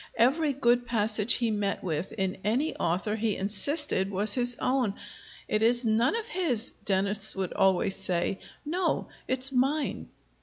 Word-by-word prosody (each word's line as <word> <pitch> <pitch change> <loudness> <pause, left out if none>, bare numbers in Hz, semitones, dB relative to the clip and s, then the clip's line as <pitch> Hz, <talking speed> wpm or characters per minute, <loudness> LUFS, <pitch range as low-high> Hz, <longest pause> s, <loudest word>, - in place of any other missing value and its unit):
Every 280 +7 +2
good 245 -2 +1
passage 220 -1 +2
he 235 -2 0
met 205 -2 -2
with 165 -1 -3
in 190 -3 -3
any 250 +10 -1
author 185 +6 -1
he 220 -1 -1
insisted 205 - 0
was 200 +2 +2
his 245 -1 +4
own. 250 -6 0 0.5
"It 215 - -1
is 240 +2 +2
none 225 - +2
of 455 -1 -4
his," 290 - +1
Dennis 200 +2 -1
would 190 -2 -4
always 195 0 +1
say: 190 0 -1 0.3
"no, 355 +5 -2 0.2
it's 260 +1 +4
mine!" 265 - -1
220 Hz, 150 wpm, -27 LUFS, 195-255 Hz, 0.5 s, his